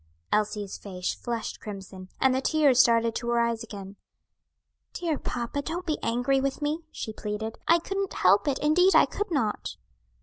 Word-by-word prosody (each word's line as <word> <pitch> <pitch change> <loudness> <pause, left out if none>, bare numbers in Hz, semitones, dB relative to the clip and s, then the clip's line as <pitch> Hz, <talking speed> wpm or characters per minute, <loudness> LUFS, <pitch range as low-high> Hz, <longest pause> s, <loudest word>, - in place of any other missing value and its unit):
Elsie's 210 -2 -1
face 180 -3 -3
flushed 235 -2 -4
crimson, 190 -3 -9
and 265 -1 +4
the 260 - 0
tears 285 -4 +3
started 230 -2 +5
to 235 +1 -3
her 235 0 +2
eyes 235 -1 0
again. 200 -3 -9 1.0
"Dear 330 -5 -2
papa, 240 +4 -3
don't 340 +5 -4
be 310 -3 -1
angry 245 +3 +1
with 275 0 -1
me," 300 +2 -1
she 220 - -6
pleaded. 215 +1 -5
"I 335 - +6
couldn't 390 +3 -3
help 360 - +4
it; 275 -2 +1
indeed 360 +6 +4
I - - +7
could 415 - -4
not." 240 -11 -1
240 Hz, 170 wpm, -27 LUFS, 215-300 Hz, 1.0 s, I